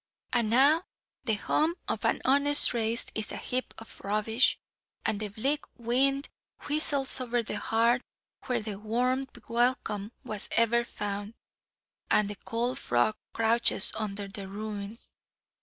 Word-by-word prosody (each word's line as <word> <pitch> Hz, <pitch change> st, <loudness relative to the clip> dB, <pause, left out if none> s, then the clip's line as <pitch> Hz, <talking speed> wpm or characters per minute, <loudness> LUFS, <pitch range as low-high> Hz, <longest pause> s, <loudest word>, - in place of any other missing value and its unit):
"And 235 Hz, -3 st, +2 dB
now, 280 Hz, +8 st, +5 dB, 0.4 s
the 220 Hz, -, +1 dB
home 310 Hz, +10 st, +1 dB
of -, -, -2 dB
an -, -, +1 dB
honest 285 Hz, +2 st, +4 dB
race 230 Hz, 0 st, +2 dB
is 215 Hz, -1 st, -1 dB
a -, -, -5 dB
heap 255 Hz, +1 st, -3 dB
of 225 Hz, -, -12 dB
rubbish; 215 Hz, +5 st, +2 dB, 0.5 s
and 205 Hz, -, 0 dB
the 215 Hz, -, -3 dB
bleak 265 Hz, +9 st, -1 dB
wind 270 Hz, +4 st, +1 dB, 0.4 s
whistles 285 Hz, -3 st, +3 dB
over 240 Hz, -1 st, 0 dB
the 210 Hz, -, -4 dB
hearth 235 Hz, +3 st, +2 dB, 0.5 s
where 245 Hz, -4 st, 0 dB
the 210 Hz, -2 st, -5 dB
warm 250 Hz, +5 st, 0 dB, 0.2 s
welcome 230 Hz, -3 st, 0 dB
was 215 Hz, -5 st, -4 dB
ever 230 Hz, +1 st, +3 dB
found; 205 Hz, -1 st, -5 dB, 0.7 s
and 205 Hz, -1 st, +3 dB
the -, -, -6 dB
cold 235 Hz, +5 st, -2 dB
frog 120 Hz, -, +1 dB, 0.2 s
crouches 230 Hz, -2 st, +5 dB
under 205 Hz, -2 st, -4 dB
the 195 Hz, 0 st, -8 dB
ruins. 205 Hz, +2 st, -4 dB
230 Hz, 140 wpm, -29 LUFS, 210-255 Hz, 0.7 s, now